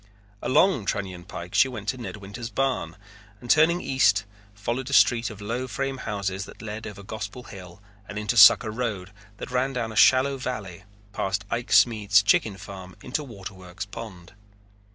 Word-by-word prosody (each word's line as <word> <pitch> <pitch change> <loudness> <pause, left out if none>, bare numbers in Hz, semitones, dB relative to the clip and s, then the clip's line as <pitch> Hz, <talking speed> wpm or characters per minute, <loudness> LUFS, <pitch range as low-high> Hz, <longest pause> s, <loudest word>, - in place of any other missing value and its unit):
Along 130 - +3
Trunion 95 -3 -3
Pike 85 +1 -8
she 100 +6 +5
went 110 -6 -7
to 130 - -2
Ned 120 - -6
Winters' 100 +4 -7
barn 125 -12 -1 0.4
and 120 - -1
turning 165 +3 +4
east 110 -6 +2 0.3
followed 120 +6 -3
a - - -4
street 120 -4 +4
of 105 -1 -10
low 120 +5 -3
frame 135 +2 -3
houses 100 -4 -3
that - - -14
led 110 0 -6
over 100 -1 -9
Gospel 110 +3 -7
Hill 95 -3 -12 0.3
and 105 - -6
into 105 +2 -1
Sucker 110 +1 +8
Road 105 -5 -4 0.3
that - - -7
ran 130 +2 0
down 115 -3 -3
a - - -9
shallow 130 +5 +5
valley 100 -8 -6 0.3
past 100 +1 -2
Ike 120 +1 -3
Smead's 105 -4 +5
chicken 105 0 +2
farm 95 -2 -10 0.2
to 150 - 0
Waterworks 95 -5 -8
Pond. 95 -4 -10
105 Hz, 170 wpm, -25 LUFS, 95-125 Hz, 0.4 s, Sucker